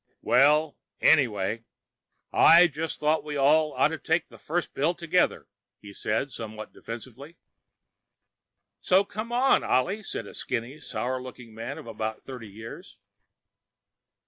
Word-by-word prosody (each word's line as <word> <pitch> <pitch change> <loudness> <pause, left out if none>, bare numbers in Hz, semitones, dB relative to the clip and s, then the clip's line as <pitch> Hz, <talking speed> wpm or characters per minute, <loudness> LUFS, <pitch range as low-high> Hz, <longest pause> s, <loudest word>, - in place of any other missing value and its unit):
"Well... 150 +4 +3 0.2
anyway, 115 -7 +2 0.7
I 170 +2 +8
just 160 0 -4
thought 155 0 +1
we 150 -1 -4
all 150 +2 +3
oughta 160 +2 +1
take 160 +2 0
the - - -15
first 175 +2 -3
pills 160 +6 0
together," 175 +1 0 0.3
he 100 -1 -12
said, 110 +8 -2
somewhat 110 -2 -8
defensively. 130 +7 -9 1.4
"So 190 +2 +3
come 215 +4 -6
on, 250 +3 +3
Ollie," 190 +12 +1
said 195 - -5
a - - -11
skinny, 125 +3 -4
sour 130 +1 -3
looking 125 -3 -11
man 115 +1 -6
of - - -10
about 110 -1 -5
thirty 125 -5 -9
years. 110 +3 -11
140 Hz, 130 wpm, -27 LUFS, 115-160 Hz, 1.4 s, I